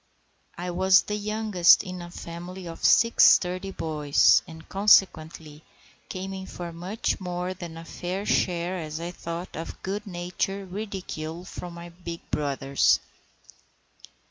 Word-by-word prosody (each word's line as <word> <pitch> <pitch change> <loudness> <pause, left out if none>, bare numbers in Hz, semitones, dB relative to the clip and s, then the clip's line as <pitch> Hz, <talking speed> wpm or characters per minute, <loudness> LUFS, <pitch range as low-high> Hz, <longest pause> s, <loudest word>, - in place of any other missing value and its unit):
I 180 +1 -4
was 190 +2 +5
the 210 - -3
youngest 210 -4 +4
in 185 -2 -7
a 175 - -8
family 175 +2 -8
of 165 - -9
six 230 0 +5
sturdy 185 +2 +4
boys, 150 -5 +3
and 160 -1 -12
consequently 160 -6 +2 0.5
came 190 +1 -5
in 190 0 -7
for 175 -1 -7
much 180 +6 -2
more 180 0 -3
than 175 -3 -8
a 165 - -9
fair 185 +4 -4
share, 180 -1 0
as 155 -1 -5
I 170 +1 -4
thought, 170 +1 -6
of 165 - -7
good 205 +2 -4
natured 185 +2 -3
ridicule 180 -5 -5
from 175 -2 -8
my 170 0 -9
big 170 -1 -8
brothers. 140 -2 +2
175 Hz, 140 wpm, -26 LUFS, 165-190 Hz, 0.5 s, was